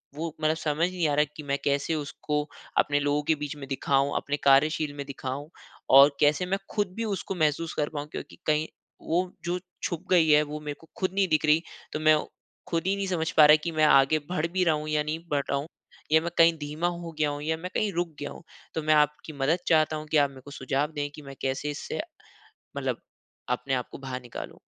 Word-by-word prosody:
वो 160 Hz, +1 st, -4 dB
मतलब 155 Hz, +1 st, +2 dB
समझ 160 Hz, +3 st, 0 dB
नहीं 180 Hz, -3 st, 0 dB
आ -, -, +1 dB
रहा 150 Hz, +1 st, +4 dB
कि 155 Hz, -, -6 dB
मैं 140 Hz, -1 st, -1 dB
कैसे 140 Hz, +3 st, +1 dB
उसको 150 Hz, 0 st, -2 dB, 0.4 s
अपने 145 Hz, 0 st, +3 dB
लोगों 145 Hz, +1 st, +1 dB
के 160 Hz, +2 st, +2 dB
बीच 145 Hz, 0 st, -3 dB
में 135 Hz, -2 st, -8 dB
दिखाऊँ, 135 Hz, +1 st, +1 dB
अपने 145 Hz, +1 st, -2 dB
कार्यशील 145 Hz, +2 st, +4 dB
में 140 Hz, -, -4 dB
दिखाऊँ, 140 Hz, +1 st, -5 dB, 0.4 s
और 140 Hz, +2 st, +8 dB
कैसे 150 Hz, +4 st, +3 dB
मैं 195 Hz, +2 st, -1 dB
खुद 205 Hz, -4 st, -1 dB
भी 230 Hz, -, -2 dB
उसको 195 Hz, -2 st, -3 dB
महसूस 155 Hz, 0 st, 0 dB
कर 150 Hz, -1 st, 0 dB
पाऊँ 145 Hz, -1 st, -5 dB
क्योंकि -, -, -7 dB
कहीं 155 Hz, +1 st, +2 dB, 0.3 s
वो 180 Hz, +3 st, 0 dB
जो 175 Hz, +1 st, -1 dB, 0.2 s
छुप 170 Hz, 0 st, -2 dB
गई 170 Hz, -3 st, +5 dB
है 150 Hz, 0 st, +7 dB
वो 150 Hz, 0 st, -6 dB
मेरे 150 Hz, -1 st, -5 dB
को 165 Hz, -, -17 dB
खुद 185 Hz, -1 st, 0 dB
नहीं 195 Hz, -1 st, +3 dB
दिख 155 Hz, -1 st, +2 dB
रही। 155 Hz, +1 st, +4 dB, 0.3 s
तो 155 Hz, -, -2 dB
मैं 155 Hz, 0 st, +5 dB
औ 150 Hz, -, -2 dB, 0.4 s
खुद 165 Hz, -1 st, 0 dB
ही 195 Hz, -, +2 dB
नहीं 200 Hz, 0 st, -2 dB
समझ 165 Hz, -3 st, -1 dB
पा 155 Hz, -, +10 dB
रहा 150 Hz, -, +9 dB
कि 170 Hz, -, -2 dB
मैं 155 Hz, -1 st, +2 dB
आगे 135 Hz, +1 st, +5 dB
बढ़ 165 Hz, -3 st, 0 dB
भी 185 Hz, -1 st, +2 dB
रहा 160 Hz, -2 st, +4 dB
हूँ 150 Hz, 0 st, -5 dB
या 150 Hz, -1 st, +1 dB
नहीं 155 Hz, +2 st, -3 dB
बढ़ 145 Hz, -, +2 dB
रहा 140 Hz, -, +1 dB
हूँ, 145 Hz, -, -6 dB, 0.5 s
या 160 Hz, -, +6 dB
मैं 170 Hz, 0 st, -3 dB
कहीं 165 Hz, 0 st, +7 dB
धीमा 150 Hz, +3 st, -2 dB
हो 170 Hz, -1 st, -4 dB
गया 150 Hz, -1 st, +3 dB
हूँ 145 Hz, 0 st, -4 dB
या 160 Hz, +1 st, 0 dB
मैं 180 Hz, +3 st, -6 dB
कहीं 210 Hz, -, +1 dB
रुक 175 Hz, +1 st, 0 dB
गया 145 Hz, -, -5 dB
हूँ। -, -, -11 dB, 0.3 s
तो 160 Hz, -, -1 dB
मैं 155 Hz, 0 st, +4 dB
आपकी 150 Hz, +1 st, +1 dB
मदद 145 Hz, +5 st, +1 dB
चाहता 155 Hz, -1 st, +3 dB
हूँ 155 Hz, 0 st, -7 dB
कि 155 Hz, -, +4 dB
आप 145 Hz, -1 st, +4 dB
मेरे 130 Hz, -, -13 dB
को 145 Hz, -, -10 dB
सुझाव 140 Hz, +2 st, -1 dB
दें 145 Hz, 0 st, -2 dB
कि -, -, -10 dB
मैं 135 Hz, -1 st, -10 dB
कैसे 135 Hz, +2 st, -1 dB
इससे, 145 Hz, -, -4 dB, 0.8 s
मतलब -, -, -2 dB, 0.5 s
अपने 125 Hz, +2 st, -1 dB
आप 125 Hz, -1 st, -1 dB
को -, -, -8 dB
बाहर 130 Hz, -2 st, -5 dB
निकालूँ? 120 Hz, -1 st, -8 dB
150 Hz, 240 wpm, -27 LUFS, 145-165 Hz, 0.8 s, पा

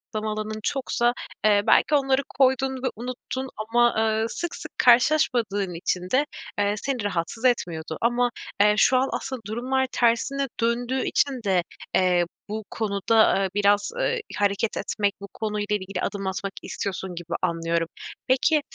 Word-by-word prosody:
lama 215 Hz, 0 st, -1 dB
alanın 215 Hz, 0 st, -4 dB
çoksa, 245 Hz, -3 st, 0 dB, 0.3 s
eee, 205 Hz, -1 st, +5 dB
belki 300 Hz, -, +5 dB
onları 270 Hz, -1 st, +2 dB, 0.2 s
koydun 265 Hz, 0 st, +3 dB
ve -, -, +1 dB
unuttun 255 Hz, +2 st, -5 dB
ama, 235 Hz, +2 st, +2 dB
eee, 220 Hz, 0 st, +2 dB
sık 345 Hz, +6 st, -4 dB
sık -, -, -9 dB
karşılaşmadığın 235 Hz, -, +3 dB
için 180 Hz, +2 st, -2 dB
de, 280 Hz, +3 st, +3 dB, 0.3 s
eee, 205 Hz, 0 st, +2 dB
seni 255 Hz, -2 st, -2 dB
rahatsız 205 Hz, +5 st, -2 dB
etmiyordu. 165 Hz, -10 st, 0 dB
Ama, 240 Hz, +1 st, +2 dB, 0.3 s
eee, 210 Hz, 0 st, +6 dB
şu 255 Hz, -, +5 dB
an 265 Hz, +1 st, +1 dB
asıl 265 Hz, -1 st, -3 dB
durumlar 260 Hz, +4 st, 0 dB
tersine 250 Hz, +4 st, +1 dB
döndüğü 245 Hz, +3 st, 0 dB
için 265 Hz, -5 st, 0 dB
de, 185 Hz, -3 st, +2 dB, 0.3 s
eee, 180 Hz, -2 st, +3 dB, 0.2 s
bu 215 Hz, 0 st, -4 dB
konuda, 210 Hz, -1 st, +2 dB
eee, 190 Hz, -, 0 dB
biraz, 205 Hz, 0 st, +3 dB
eee, 480 Hz, -2 st, 0 dB, 0.2 s
hareket 205 Hz, +2 st, 0 dB
etmek, 205 Hz, -2 st, -1 dB
bu 200 Hz, -, -7 dB
konuyla 210 Hz, -1 st, -2 dB
ilgili 195 Hz, -1 st, -4 dB
adım 195 Hz, -2 st, -3 dB
atmak 195 Hz, +1 st, -3 dB
istiyorsun 190 Hz, -2 st, -4 dB
gibi 170 Hz, 0 st, -6 dB
anlıyorum. 165 Hz, -1 st, 0 dB, 0.4 s
Peki, 295 Hz, +4 st, +3 dB
220 Hz, 150 wpm, -25 LUFS, 200-255 Hz, 0.4 s, eee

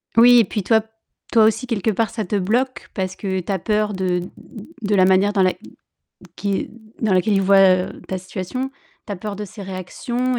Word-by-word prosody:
Oui, 240 Hz, +1 st, +8 dB
et 225 Hz, -, +4 dB
puis 205 Hz, +1 st, -3 dB
toi 220 Hz, +2 st, +3 dB, 0.5 s
toi 225 Hz, -2 st, +5 dB
aussi 225 Hz, +4 st, +2 dB
quelque 220 Hz, -2 st, 0 dB
part 220 Hz, +1 st, 0 dB
ça 220 Hz, -, -4 dB
te 195 Hz, -, -2 dB
bloque, 245 Hz, +7 st, -1 dB
parce 185 Hz, -2 st, -3 dB
que 190 Hz, -2 st, -2 dB
tu 180 Hz, -, -5 dB
as 190 Hz, -, -1 dB
peur 210 Hz, +3 st, 0 dB
de 185 Hz, -2 st, -1 dB, 0.6 s
de 205 Hz, -1 st, 0 dB
la 185 Hz, -, +5 dB
manière 190 Hz, +2 st, +3 dB
dans 195 Hz, -2 st, +3 dB
la 185 Hz, -, +3 dB, 0.8 s
qui 200 Hz, -1 st, -2 dB, 0.3 s
dans 215 Hz, -3 st, +2 dB
laquelle 195 Hz, +3 st, +2 dB
il 195 Hz, -, +2 dB
voit, 195 Hz, +1 st, +5 dB, 0.3 s
heu, -, -, -10 dB
ta 190 Hz, -, -2 dB
situation. 185 Hz, +8 st, -5 dB, 0.4 s
Tu 205 Hz, -, -5 dB
as -, -, -4 dB
peur 200 Hz, +2 st, -6 dB
de 210 Hz, -, -5 dB
ses 205 Hz, +1 st, -10 dB
réactions 240 Hz, +7 st, -3 dB
205 Hz, 210 wpm, -21 LUFS, 190-225 Hz, 0.8 s, Oui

